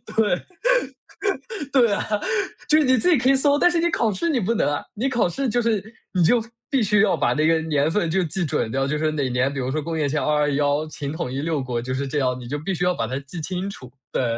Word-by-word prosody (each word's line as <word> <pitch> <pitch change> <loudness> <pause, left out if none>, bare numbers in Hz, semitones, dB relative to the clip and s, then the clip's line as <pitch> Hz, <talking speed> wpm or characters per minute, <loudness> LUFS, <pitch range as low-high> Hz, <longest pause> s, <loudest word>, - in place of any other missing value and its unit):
对。 210 -5 +2 1.3
对 245 -5 +4
啊， - - -1 0.6
就 305 - +6
是 310 - +4
你 255 0 +4
自 305 - +2
己 335 - +5
可 255 +1 0
以 275 - +5
搜， 285 +1 +3
但 355 - +5
是 345 - +1
你 340 +1 +2
考 230 -9 +1
试 335 - -1
你 285 -6 +1
不 230 +2 0
能 145 - +2
啊。 145 - -2
你 250 +6 0
考 245 -6 +2
试 270 +8 -2
就 240 +2 +1
是 225 -4 0 0.3
你 180 -2 +2
就 230 +7 +4 0.3
必 270 -4 +2
须 210 -1 +3
要 215 - +3
把 120 - +2
那 155 +4 +2
个 165 0 +3
年 150 -2 +1
份 170 -1 0
就 190 +2 +2
记 175 +3 -2
准 115 -6 -1
掉， 135 +2 0
就 145 - -1
是 155 0 0
哪 145 -3 -1
年， 125 +2 +1
比 140 - -4
如 130 0 -2
说 155 +2 -1
公 165 +2 -4
元 150 -2 +1
前 150 +1 0
221 150 0 +1
秦 145 -2 -5
统 160 -5 -4
一 135 - -2
六 155 -2 -1
国 120 -2 -2
就 130 +2 -4
是 140 +1 -2
这 145 +2 -1
样， 125 -1 0
你 120 - -9
就 145 +4 -3
必 185 +6 -3
须 175 +1 -1
要 180 - +3
把 115 - -2
它 130 +3 -3
记 140 +5 -8
清 185 +4 -3
楚， 130 -10 -10 0.2
对。 - - 0
160 Hz, 290 characters per minute, -23 LUFS, 140-220 Hz, 1.3 s, 就